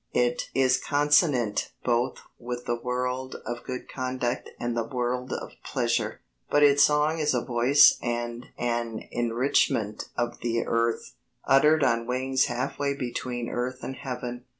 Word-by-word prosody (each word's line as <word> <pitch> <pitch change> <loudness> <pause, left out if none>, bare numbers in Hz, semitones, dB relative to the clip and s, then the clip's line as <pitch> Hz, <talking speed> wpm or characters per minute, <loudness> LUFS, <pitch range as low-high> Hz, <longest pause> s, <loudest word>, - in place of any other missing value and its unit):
It 120 0 +1
is 130 -1 +4
consonant 145 - +2
both 120 0 0 0.2
with 120 0 -5
the 120 - 0
world 125 +2 -3
of 120 +1 -5
good 125 0 -6
conduct 130 -2 -3
and 120 0 -2
the 115 - 0
world 125 +1 -2
of - - -4
pleasure, - - -1 0.3
but 145 - +4
its 145 0 +6
song 150 +2 +3
is 150 -3 +1
a 120 - -1
voice 125 +4 +5
and 120 0 -3
an 120 -2 -2
enrichment 115 -3 +1
of 120 0 -2
the 115 -1 -1
earth, 115 0 -1 0.3
uttered 150 +3 +5
on 115 -2 +1
wings 130 +1 +1
half 120 +3 -3
way 140 -1 0
between 125 -2 -4
earth 125 +2 -3
and 135 - -5
heaven. 125 -1 -6
125 Hz, 150 wpm, -27 LUFS, 120-130 Hz, 0.3 s, its